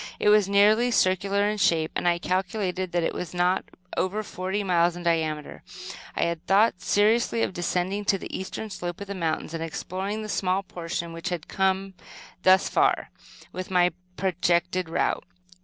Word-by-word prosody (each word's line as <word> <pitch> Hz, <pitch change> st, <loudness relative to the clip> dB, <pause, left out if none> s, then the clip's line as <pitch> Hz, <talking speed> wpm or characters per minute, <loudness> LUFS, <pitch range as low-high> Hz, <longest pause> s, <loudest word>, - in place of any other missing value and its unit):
It -, -, +3 dB
was 210 Hz, -2 st, +5 dB
nearly 210 Hz, +4 st, +5 dB
circular 200 Hz, -1 st, +2 dB
in 210 Hz, 0 st, -1 dB
shape, 165 Hz, -3 st, +2 dB
and -, -, 0 dB
I 175 Hz, 0 st, +3 dB
calculated 185 Hz, 0 st, -2 dB
that 175 Hz, -1 st, +1 dB
it -, -, 0 dB
was 180 Hz, 0 st, -5 dB
not 180 Hz, +1 st, +2 dB, 0.3 s
over 205 Hz, +4 st, -1 dB
forty 190 Hz, +1 st, -3 dB
miles 175 Hz, -2 st, +2 dB
in 175 Hz, -, -7 dB
diameter. 160 Hz, -3 st, -1 dB, 0.5 s
I -, -, +1 dB
had 170 Hz, 0 st, -2 dB
thought 200 Hz, -1 st, +3 dB
seriously 225 Hz, +2 st, +2 dB
of -, -, -1 dB
descending 180 Hz, +3 st, -1 dB
to 195 Hz, -, +3 dB
the -, -, -7 dB
eastern 195 Hz, +3 st, -5 dB
slope 175 Hz, -2 st, -5 dB
of -, -, -4 dB
the 200 Hz, -, -5 dB
mountains, 165 Hz, -3 st, -2 dB
and 165 Hz, 0 st, -3 dB
exploring 190 Hz, +6 st, -4 dB
the -, -, -5 dB
small 190 Hz, -1 st, 0 dB
portion 170 Hz, -2 st, -5 dB
which 165 Hz, 0 st, -4 dB
had 175 Hz, -3 st, -2 dB
not -, -, -19 dB
come, 190 Hz, 0 st, 0 dB, 0.5 s
thus 185 Hz, +1 st, +5 dB
far, -, -, +1 dB, 0.4 s
within 185 Hz, 0 st, -5 dB
my 180 Hz, 0 st, +5 dB, 0.3 s
projected 180 Hz, -1 st, 0 dB
route. 165 Hz, -, 0 dB
185 Hz, 175 wpm, -26 LUFS, 175-200 Hz, 0.5 s, was